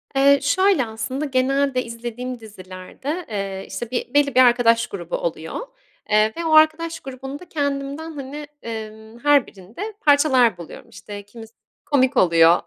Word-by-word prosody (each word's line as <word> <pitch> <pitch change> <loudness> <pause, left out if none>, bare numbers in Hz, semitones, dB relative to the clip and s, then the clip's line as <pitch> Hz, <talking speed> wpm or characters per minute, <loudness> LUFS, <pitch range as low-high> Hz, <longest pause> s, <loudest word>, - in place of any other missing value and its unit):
Eee, 280 +1 +5
şöyle 360 -1 +3
aslında, 225 +6 -4
genelde 270 -1 +1
izlediğim 240 +1 -6
dizilerde, 215 - -7
eee, 195 -2 -4
işte 225 +5 -6
bir 245 0 -3
belli 285 -2 +3
bir - - +5
arkadaş 240 -1 +5
grubu 455 +4 -5
oluyor, - - -4 0.5
eee, 215 +1 +3
ve 335 - -3
o 320 - 0
arkadaş 315 +1 +4
grubunda 270 +5 -8
kendimden 285 +1 -3
hani, 290 0 -7
emm, 220 0 -8
her 290 0 +4
birinde 225 - -8
parçalar 265 - +4
buluyorum. 170 -2 -11
İşte 205 -1 -9
kimisi 225 +2 -13 0.3
komik 260 -2 +2
oluyor, 170 -1 +5
255 Hz, 140 wpm, -22 LUFS, 220-285 Hz, 0.5 s, Eee